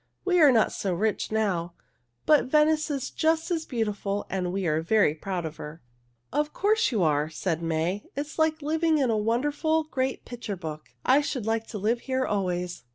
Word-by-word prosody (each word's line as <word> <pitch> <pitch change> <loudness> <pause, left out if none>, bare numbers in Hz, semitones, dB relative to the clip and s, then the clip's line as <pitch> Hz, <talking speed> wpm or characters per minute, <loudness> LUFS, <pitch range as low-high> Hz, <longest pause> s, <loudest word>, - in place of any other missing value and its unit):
We 360 -2 +3
are 295 -3 +8
not 225 -3 +3
so 190 -3 -2
rich 215 +4 -1
now, 180 -6 -1 0.5
but 300 -1 +5
Venice 305 +2 +3
is 275 -3 -3
just 320 +2 +1
as 325 -2 -1
beautiful 205 -4 -2
and 180 -2 -1
we 195 0 -2
are 155 -1 +1
very 200 -2 +3
proud 175 +2 -4
of 155 0 -6
her." 150 0 -9 0.5
"Of 300 0 0
course 425 -4 +2
you 215 -7 +1
are," 150 -1 +2
said 165 +1 -2
May. 165 +4 -1
"It 280 - -1
is 300 +2 -8
like 315 -1 +1
living 320 +1 +2
in 265 -5 +2
a - - +2
wonderful, 290 +9 +1
great 265 -3 -3
picture 235 -5 -6
book. 155 -3 -7 0.2
I 270 +3 +5
should 255 -6 -3
like 225 0 -1
to 220 - -6
live 220 +4 0
here 260 +1 -1
always." 180 -3 -2
220 Hz, 195 wpm, -27 LUFS, 180-295 Hz, 0.5 s, are